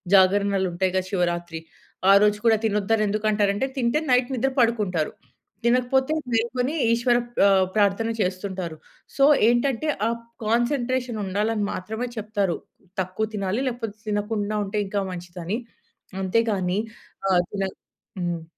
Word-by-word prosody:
జాగరణలుంటాయిగా! 190 -1 +3
శివరాత్రి 175 -3 -1 0.5
ఆరోజు 210 +1 +5
కూడా 225 -1 +6
తినొద్దని 215 0 +1
ఎందుకు 215 +1 -2
అంటారంటే, 205 +3 +1
తింటే 245 +2 +1
నైట్ 250 +1 +3
నిద్ర 265 +2 +1
పడుకుంటారు. 210 -9 +1 0.5
తినకపోతే 255 +4 +2 0.2
మేలుకొని 245 +5 0 0.2
ఈశ్వర 240 +1 +3 0.2
ప్ - - -3
ఆహ్, 190 -1 +4
ప్రార్థన 210 +2 +2
చేస్తుంటారు. 185 -3 -3 0.4
సో, 275 - +6 0.2
ఏంటంటే, 250 +4 +1 0.2
ఆ - - +2 0.4
కాన్సన్‌ట్రేషన్ 240 0 0
ఉండాలని 210 +2 0
మాత్రమే 220 +6 -4
చెప్తారు. 205 -4 -1 0.4
తక్కువ 185 +4 -2
తినాలి. 195 +4 -1
లేకపోతే 225 -4 -6
తినకుండా 210 0 -1
ఉంటే 210 +2 -2
ఇంకా 200 0 -1
మంచిదని. 180 +4 -5 0.6
అంతేగాని 195 -2 +1 0.5
ఆహ్, 175 -1 +4
తినక 195 -2 -2 0.5
హ్మ్. 170 -2 -2
210 Hz, 115 wpm, -24 LUFS, 190-235 Hz, 0.6 s, కూడా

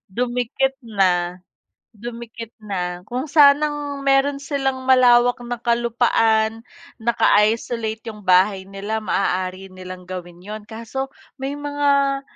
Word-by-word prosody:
Dumikit 250 +2 0
na. 185 -5 +1 0.6
Dumikit 230 0 -8
na 180 -4 -4
kung 260 +4 -4
sanang 290 -1 +3
mayro'n 275 +1 +2
silang 270 -3 -2
malawak 245 -2 +5
na 240 -1 -5
kalupaan. 225 -2 +1 0.3
Naka-isolate 225 0 +1
'yong 210 -2 -13
bahay 190 +1 +3
nila, 200 +3 -4
maaari 185 -2 -2
nilang 185 0 -9
gawin 175 -1 -8
'yon. 210 +2 -8
Kaso 230 +4 -5 0.3
may 270 +1 -3
mga 285 -1 +1
230 Hz, 105 wpm, -21 LUFS, 200-270 Hz, 0.6 s, malawak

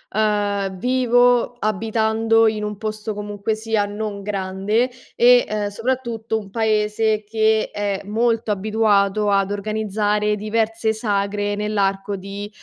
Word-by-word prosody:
ehm, 205 -2 0
vivo 245 0 +3
abitando 225 +1 +2
in 215 -1 -1
un 210 -1 -4
posto 215 0 -4
comunque 205 +1 -3
sia 220 -1 0
non 205 0 -5
grande 200 +4 -1 0.3
e, 245 +1 +6
ehm, 210 -1 -2
soprattutto 230 0 -2
un 200 -2 -11
paese 215 0 +1
che 220 0 +1
è 200 -1 -2
molto 225 +1 0
abituato 210 0 +2
ad 195 0 +2
organizzare 210 0 -1
diverse 220 +1 0
sagre 205 -1 -1
nell'arco 200 -1 -1
di, 200 +2 -7
215 Hz, 120 wpm, -21 LUFS, 205-225 Hz, 0.3 s, e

